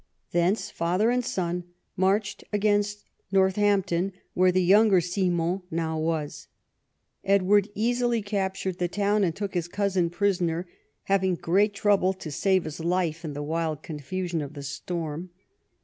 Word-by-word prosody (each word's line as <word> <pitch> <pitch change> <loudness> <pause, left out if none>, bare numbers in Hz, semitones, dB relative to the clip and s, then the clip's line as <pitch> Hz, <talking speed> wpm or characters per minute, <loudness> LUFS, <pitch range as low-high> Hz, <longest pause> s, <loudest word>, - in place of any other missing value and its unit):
Thence 175 +5 +1
father 180 +7 +1
and 250 0 +1
son 180 -4 -2 0.3
marched 195 +3 0
against 205 0 +1 0.3
North 190 0 +3
ampton, 195 -2 +1 0.2
where 185 0 +4
the 185 0 +2
younger 200 +1 +6
Simon 175 0 0
now 160 -1 -2
was. 155 -2 -2 0.8
Edward 200 +1 +3
easily 240 +1 +1
captured 190 -2 -2
the 175 - +1
town 205 +3 +1
and 170 -4 0
took 200 -2 -4
his 175 -2 -1
cousin 190 -2 0
prisoner, 175 -2 0 0.4
having 190 -2 +1
great 200 +5 +1
trouble 200 -2 +3
to 185 -5 -8
save 190 +4 +2
his 155 0 -7
life 170 -1 -1
in 155 -3 -4
the 145 +1 -4
wild 155 0 -2
confusion 170 +3 -3
of 145 +1 -7
the 140 - -7
storm. 160 +4 -4
185 Hz, 145 wpm, -26 LUFS, 170-200 Hz, 0.8 s, younger